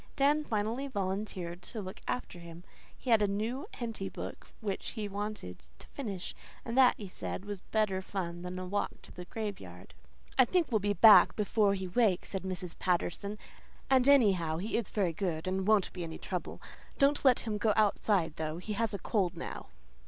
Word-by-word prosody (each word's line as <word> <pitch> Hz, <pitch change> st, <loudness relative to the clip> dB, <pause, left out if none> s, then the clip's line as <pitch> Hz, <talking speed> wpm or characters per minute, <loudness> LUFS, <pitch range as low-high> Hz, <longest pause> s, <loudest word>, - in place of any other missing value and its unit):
Dan 295 Hz, +2 st, +3 dB
finally 225 Hz, +3 st, -1 dB
volunteered 190 Hz, -5 st, -3 dB
to 220 Hz, -, -7 dB
look 190 Hz, 0 st, -7 dB
after 245 Hz, -7 st, -3 dB
him. 170 Hz, 0 st, -11 dB, 0.3 s
He 255 Hz, -, -3 dB
had 225 Hz, -2 st, +6 dB
a 205 Hz, -, +3 dB
new 220 Hz, +7 st, -2 dB
Henty 225 Hz, -5 st, -4 dB
book -, -, -7 dB
which 200 Hz, -4 st, -3 dB
he 215 Hz, -3 st, -3 dB
wanted 205 Hz, -, -5 dB, 0.2 s
to -, -, -14 dB
finish, 200 Hz, -10 st, -5 dB, 0.3 s
and 230 Hz, -, -3 dB
that, 260 Hz, -1 st, +6 dB
he 205 Hz, -, -7 dB
said, 185 Hz, +1 st, -5 dB
was 205 Hz, -2 st, -5 dB
better 210 Hz, -4 st, 0 dB
fun 175 Hz, -3 st, -4 dB
than 180 Hz, +1 st, -5 dB
a 185 Hz, -, -4 dB
walk 205 Hz, +3 st, -2 dB
to -, -, -13 dB
the 180 Hz, -, -9 dB
graveyard. 205 Hz, 0 st, -7 dB, 0.5 s
"I 260 Hz, -, +9 dB
think 335 Hz, +2 st, +1 dB
we'll 220 Hz, -, +3 dB
be 205 Hz, 0 st, 0 dB
back 210 Hz, +3 st, +8 dB
before 205 Hz, -1 st, +2 dB
he 190 Hz, -1 st, -4 dB
wakes," 195 Hz, -2 st, +2 dB
said 195 Hz, -, -2 dB
Mrs. 185 Hz, -2 st, -5 dB
Patterson, 185 Hz, +3 st, -1 dB, 0.5 s
"and 260 Hz, 0 st, +5 dB
anyhow 190 Hz, -, +4 dB
he 205 Hz, +6 st, -3 dB
is 230 Hz, -4 st, 0 dB
very 190 Hz, -6 st, 0 dB
good 165 Hz, -2 st, -2 dB
and 190 Hz, +1 st, -1 dB
won't 215 Hz, -3 st, +3 dB
be 180 Hz, -, -5 dB
any 160 Hz, -1 st, -6 dB
trouble. -, -, -5 dB, 0.4 s
Don't 280 Hz, +1 st, +3 dB
let 260 Hz, -3 st, +5 dB
him 215 Hz, -2 st, -3 dB
go 215 Hz, 0 st, +3 dB
outside, 200 Hz, -6 st, +2 dB
though. 155 Hz, 0 st, -3 dB
He 195 Hz, +4 st, -4 dB
has 220 Hz, 0 st, 0 dB
a -, -, -2 dB
cold 190 Hz, -2 st, 0 dB
now." -, -, -6 dB
205 Hz, 190 wpm, -31 LUFS, 185-225 Hz, 0.5 s, I